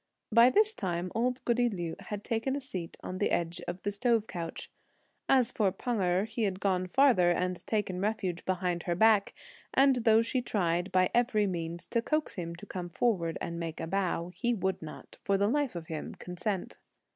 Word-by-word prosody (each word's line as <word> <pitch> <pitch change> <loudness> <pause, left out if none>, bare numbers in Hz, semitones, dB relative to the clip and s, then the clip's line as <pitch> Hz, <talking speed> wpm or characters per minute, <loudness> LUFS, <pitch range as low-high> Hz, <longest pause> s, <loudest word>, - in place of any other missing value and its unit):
By 230 +3 +7
this 430 +8 +3
time 180 - -3
old 250 +2 -1
goody 240 0 +2
Liu 175 -6 -4
had 210 -1 -6
taken 230 +4 -1
a - - -2
seat 185 -11 -6
on 185 - -5
the - - +2
edge 170 0 -1
of 175 +1 -5
the 205 - 0
stove 225 +1 +1
couch. 170 -5 -6 0.6
As 255 -4 +4
for 200 -4 +1
Pan 225 +3 -2
Erh, 180 +2 +2
he 230 - -5
had 195 -3 0
gone 185 -2 0
further, 225 -5 +4
and 180 +1 0
taken 190 -4 -1
refuge 195 -4 -1
behind 180 -2 -1
her 175 - +2
back; 215 +1 +4 0.4
and 270 -1 +5
though 225 -1 +4
she 250 +2 0
tried, 175 -5 0
by 185 -1 +3
every 235 -3 +3
means, 170 -2 -3
to 235 - 0
coax 305 +5 -1
him 170 -2 -5
to 175 - -11
come 180 -3 -5
forward 175 -4 0
and 170 0 -4
make 165 -1 -5
a - - -3
bow, 175 -1 -1
he 240 +6 -1
would 190 -2 -1
not, 155 -1 -10
for 200 -1 +2
the 200 +1 +2
life 280 -2 0
of 170 -2 -5
him, 155 -1 -6
consent. 180 +2 -4
195 Hz, 200 wpm, -30 LUFS, 175-230 Hz, 0.6 s, By